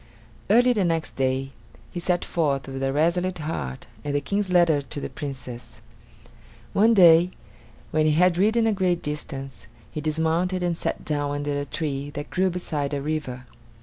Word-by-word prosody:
Early 245 Hz, +4 st, +5 dB
the 210 Hz, -4 st, +1 dB
next 165 Hz, -2 st, 0 dB
day 135 Hz, 0 st, 0 dB, 0.4 s
he 175 Hz, -, -4 dB
set 175 Hz, 0 st, 0 dB
forth, 140 Hz, -5 st, 0 dB
with 135 Hz, 0 st, -5 dB
a 135 Hz, 0 st, +1 dB
resolute 170 Hz, +5 st, +1 dB
heart 110 Hz, -, -4 dB, 0.2 s
and 145 Hz, -1 st, -2 dB
the -, -, +3 dB
King's 200 Hz, +7 st, -2 dB
letter 170 Hz, -5 st, +4 dB
to 140 Hz, -, -7 dB
the -, -, -5 dB
Princess. 130 Hz, -4 st, -7 dB, 0.9 s
One 225 Hz, +3 st, +5 dB
day 175 Hz, -2 st, +7 dB, 0.6 s
when 155 Hz, 0 st, +2 dB
he 155 Hz, -, +3 dB
had 175 Hz, +2 st, +4 dB
ridden 220 Hz, +4 st, +3 dB
a 220 Hz, -, +3 dB
great 185 Hz, -3 st, 0 dB
distance, 135 Hz, -2 st, -6 dB, 0.2 s
he 155 Hz, -, -4 dB
dismounted 160 Hz, +4 st, 0 dB
and 175 Hz, -1 st, 0 dB
sat -, -, -3 dB
down 145 Hz, -1 st, -1 dB
under 145 Hz, 0 st, -2 dB
a 145 Hz, -, -3 dB
tree 145 Hz, -2 st, -3 dB
that 145 Hz, 0 st, -6 dB
grew 185 Hz, 0 st, +2 dB
beside 150 Hz, -5 st, -2 dB
a -, -, -1 dB
river. 145 Hz, -5 st, -3 dB
155 Hz, 175 wpm, -25 LUFS, 145-180 Hz, 0.9 s, day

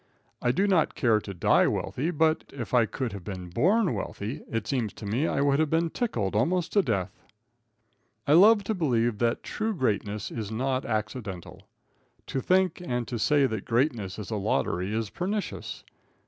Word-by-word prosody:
I 120 Hz, -, +2 dB
do 190 Hz, +10 st, +1 dB
not 185 Hz, -6 st, +2 dB
care 115 Hz, -4 st, +3 dB
to 100 Hz, -, -7 dB
die 90 Hz, -, +3 dB
wealthy, 150 Hz, +6 st, -1 dB
but 160 Hz, -1 st, +1 dB
if 125 Hz, -4 st, -7 dB
I 120 Hz, -3 st, +4 dB
could 125 Hz, +1 st, -4 dB
have 100 Hz, -3 st, -7 dB
been 90 Hz, -3 st, -6 dB
born 190 Hz, -, +2 dB
wealthy, 110 Hz, +6 st, -5 dB
it 115 Hz, -1 st, -2 dB
seems 120 Hz, -7 st, -1 dB
to -, -, -9 dB
me 120 Hz, +10 st, 0 dB
I 140 Hz, -, 0 dB
would 140 Hz, 0 st, +3 dB
have 155 Hz, -1 st, +2 dB
been 165 Hz, +1 st, +1 dB
tickled 115 Hz, -, -2 dB
almost 170 Hz, -, +1 dB
to 205 Hz, -, +5 dB
death. 100 Hz, -, -1 dB, 1.1 s
I 145 Hz, -, +3 dB
love 205 Hz, +5 st, +7 dB
to 220 Hz, -, -1 dB
believe 120 Hz, -, +1 dB
that 115 Hz, -1 st, 0 dB
true 220 Hz, 0 st, -2 dB
greatness 105 Hz, -, -1 dB
is 110 Hz, -3 st, -4 dB
not 130 Hz, +4 st, -1 dB
accidental. 110 Hz, -4 st, -4 dB, 0.6 s
To 135 Hz, -, -3 dB
think 185 Hz, +2 st, +2 dB
and 125 Hz, -7 st, -2 dB
to 120 Hz, -, -3 dB
say 145 Hz, +2 st, +3 dB
that 110 Hz, -5 st, -2 dB
greatness 115 Hz, -6 st, 0 dB
is 105 Hz, +1 st, -7 dB
a 110 Hz, -, -1 dB
lottery 95 Hz, -1 st, -1 dB
is 110 Hz, -1 st, -2 dB
pernicious. 200 Hz, +3 st, -4 dB
125 Hz, 180 wpm, -27 LUFS, 110-160 Hz, 1.1 s, love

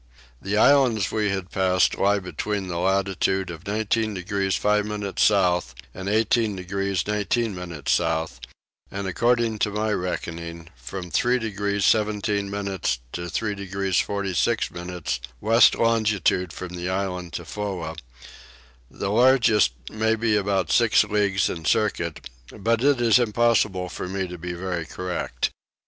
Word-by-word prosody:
The 100 Hz, +2 st, -1 dB
islands 120 Hz, -6 st, +4 dB
we 105 Hz, -1 st, 0 dB
had 95 Hz, -2 st, -3 dB
passed 95 Hz, -1 st, +2 dB
lie 100 Hz, +1 st, +2 dB
between 100 Hz, +1 st, -4 dB
the 85 Hz, -1 st, -3 dB
latitude 95 Hz, 0 st, 0 dB
of 85 Hz, +4 st, -10 dB
19 110 Hz, +1 st, 0 dB
degrees 95 Hz, +1 st, -1 dB
5 105 Hz, 0 st, +2 dB
minutes 105 Hz, -2 st, -3 dB
south 90 Hz, -, +3 dB, 0.2 s
and 95 Hz, +1 st, -5 dB
18 110 Hz, 0 st, +2 dB
degrees 95 Hz, 0 st, -2 dB
19 105 Hz, +2 st, 0 dB
minutes 85 Hz, -6 st, -4 dB
south, 80 Hz, -6 st, 0 dB, 0.5 s
and 100 Hz, 0 st, -5 dB
according 115 Hz, +2 st, +1 dB
to 105 Hz, -, +1 dB
my 105 Hz, +1 st, -1 dB
reckoning 85 Hz, -3 st, -4 dB
from 90 Hz, +9 st, -7 dB
3 120 Hz, +10 st, +2 dB
degrees 100 Hz, -3 st, -1 dB
17 105 Hz, -2 st, +1 dB
minutes 100 Hz, -9 st, -2 dB
to 85 Hz, 0 st, -5 dB
3 105 Hz, +2 st, -1 dB
degrees 100 Hz, -2 st, -1 dB
46 100 Hz, -4 st, 0 dB
minutes 85 Hz, -7 st, -4 dB, 0.2 s
west 115 Hz, +2 st, +5 dB
longitude 110 Hz, -6 st, +1 dB
from 90 Hz, +2 st, -7 dB
the 90 Hz, 0 st, -4 dB
island 95 Hz, -2 st, -3 dB
Tofoa: 85 Hz, -1 st, -4 dB, 0.9 s
the 100 Hz, -, -4 dB
largest 115 Hz, -, +4 dB, 0.2 s
may 110 Hz, +1 st, +1 dB
be 110 Hz, -1 st, +1 dB
about 100 Hz, -2 st, 0 dB
six 115 Hz, -3 st, +4 dB
leagues 105 Hz, -2 st, +1 dB
in 80 Hz, -, -5 dB
circuit; 85 Hz, -3 st, 0 dB, 0.2 s
but 115 Hz, +3 st, -1 dB
it 140 Hz, -2 st, +4 dB
is 120 Hz, 0 st, +5 dB
impossible 110 Hz, -5 st, +2 dB
for 90 Hz, -, -6 dB
me 95 Hz, 0 st, -3 dB
to 90 Hz, -1 st, -8 dB
be 90 Hz, +1 st, -5 dB
very 85 Hz, -2 st, -4 dB
correct. 90 Hz, -1 st, -3 dB
100 Hz, 140 wpm, -24 LUFS, 90-105 Hz, 0.9 s, west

